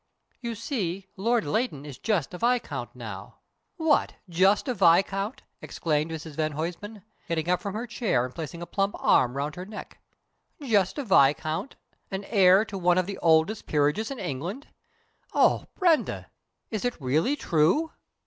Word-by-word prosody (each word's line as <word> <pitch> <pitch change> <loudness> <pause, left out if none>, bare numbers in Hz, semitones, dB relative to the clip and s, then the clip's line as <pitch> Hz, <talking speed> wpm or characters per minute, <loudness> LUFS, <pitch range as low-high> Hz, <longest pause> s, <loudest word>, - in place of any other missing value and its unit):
You 235 -2 -4
see, 195 - -3
Lord 230 +3 +1
Leighton 215 - -1
is 140 -4 -9
just 185 - -1
a 180 - -6
viscount 245 +1 -1
now - - -8 0.2
" - - -50
"What, 320 -3 +2
just 190 - +3
a 255 - +1
viscount!" 195 +3 +2 0.2
exclaimed 155 -1 -1
Mrs 160 0 -6
van 155 +1 -1
Huysman, 180 +7 -5 0.2
getting 165 -1 -1
up 180 0 +1
from 200 +1 -4
her 230 +3 -3
chair 225 - 0
and 130 - -8
putting 170 +1 -6
a - - -5
plump 195 +3 -1
arm 125 +2 +3
round 145 +2 -2
her 180 +2 -7
neck. 215 - -9 0.6
"Just 215 - +1
a 285 - -2
viscount 155 - +2 0.3
and 195 +1 -4
heir 195 -1 +5
to 195 -2 -6
one 175 0 +3
of 185 - +2
the 200 +1 -6
oldest 165 +6 +2
peerages 150 +8 +1
in 275 - -5
England! 180 - -5 0.7
Oh, - - +3
Brenda, 345 -5 +1 0.4
is 215 -3 -3
it 245 -6 -2
really 155 - +1
true?" 180 - +2
190 Hz, 165 wpm, -27 LUFS, 160-225 Hz, 0.7 s, heir